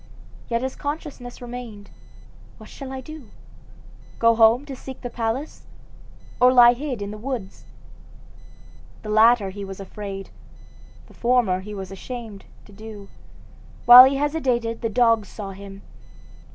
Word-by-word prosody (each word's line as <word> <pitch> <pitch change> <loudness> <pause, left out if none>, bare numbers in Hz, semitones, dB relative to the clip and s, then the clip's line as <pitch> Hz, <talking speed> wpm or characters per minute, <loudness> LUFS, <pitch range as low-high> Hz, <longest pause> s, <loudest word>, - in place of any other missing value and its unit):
Yet 235 +1 -1
his 260 - -4
consciousness 285 -5 -7
remained. 235 -4 -9 0.7
What - - -14
shall 270 -2 -9
he 265 0 -7
do? 310 -5 -11 0.9
go 230 0 +4
home 230 +4 +4
to 275 -2 -7
seek 265 0 -10
the 245 - -6
palace, 235 +6 -4 0.7
or 250 0 +7
lie 240 -1 +7
hid 255 -4 -5
in 200 - -6
the 215 - -9
woods? 230 -5 -6 1.4
The 215 - -7
latter 215 -2 +4
he 200 +1 -8
was 195 0 -8
afraid, 195 0 -8 0.7
the - - -19
former 235 -6 +1
he 210 +2 -9
was 190 -1 -7
ashamed, 220 0 -9 0.2
to - - -17
do. 210 -1 -11 0.8
While 245 +1 +11
he 270 +1 +1
hesitated 260 -6 -1
the 230 - -1
dogs 230 -2 +2
saw 200 -2 -8
him. 195 0 -11
230 Hz, 140 wpm, -23 LUFS, 205-255 Hz, 1.4 s, While